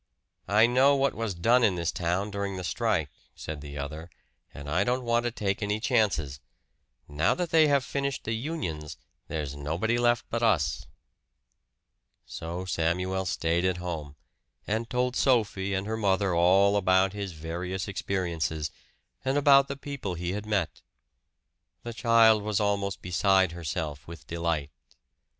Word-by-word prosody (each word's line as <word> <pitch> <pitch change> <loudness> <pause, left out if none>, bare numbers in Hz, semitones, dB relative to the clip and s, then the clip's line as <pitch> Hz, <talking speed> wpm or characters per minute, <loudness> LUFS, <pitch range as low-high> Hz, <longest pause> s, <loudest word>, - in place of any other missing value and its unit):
"I 105 +2 +5
know 130 +4 +4
what 140 -1 +1
was 110 -4 -3
done 120 +8 +3
in 100 -5 +3
this 85 -1 -1
town 90 +4 -1
during 100 -1 -3
the 90 - -5
strike," 80 - 0 0.2
said 75 -2 -7
the 75 0 -8
other, 75 +4 -6 0.4
"and 70 +1 -10
I 85 +6 +1
don't 125 +3 0
want 120 0 +1
to 120 - 0
take 100 -2 -2
any 105 +1 -1
chances. 105 - +1 0.7
Now 75 +2 +1
that 180 -2 -3
they 160 -1 +6
have 140 -3 +2
finished 140 0 -2
the 110 - -2
unions, 110 - -4 0.3
there's 75 -3 -4
nobody 85 +12 -1
left 120 0 +2
but 115 - -1
us." 75 - +1 1.4
So 85 +3 -6
Samuel 90 +2 -1
stayed 85 +1 0
at 95 -1 +1
home, 80 -5 -5 0.5
and 110 +2 -2
told 125 +1 0
Sophie 100 -6 +1
and 95 +1 -2
her 110 +1 -2
mother 100 -3 +1
all 95 +4 +4
about 95 0 +3
his 100 -3 -5
various 85 +5 -4
experiences, 85 -6 -2 0.5
and 135 +2 0
about 140 -1 +6
the 140 - -5
people 140 -10 -5
he 85 +1 -3
had 105 +2 -5
met. 100 -6 -1 1.0
The 120 - -5
child 115 -2 +5
was 105 0 -1
almost 100 -2 -1
beside 95 0 +3
herself 80 -3 -5
with 85 -3 -10
delight. 85 -3 -2
95 Hz, 155 wpm, -28 LUFS, 85-115 Hz, 1.4 s, they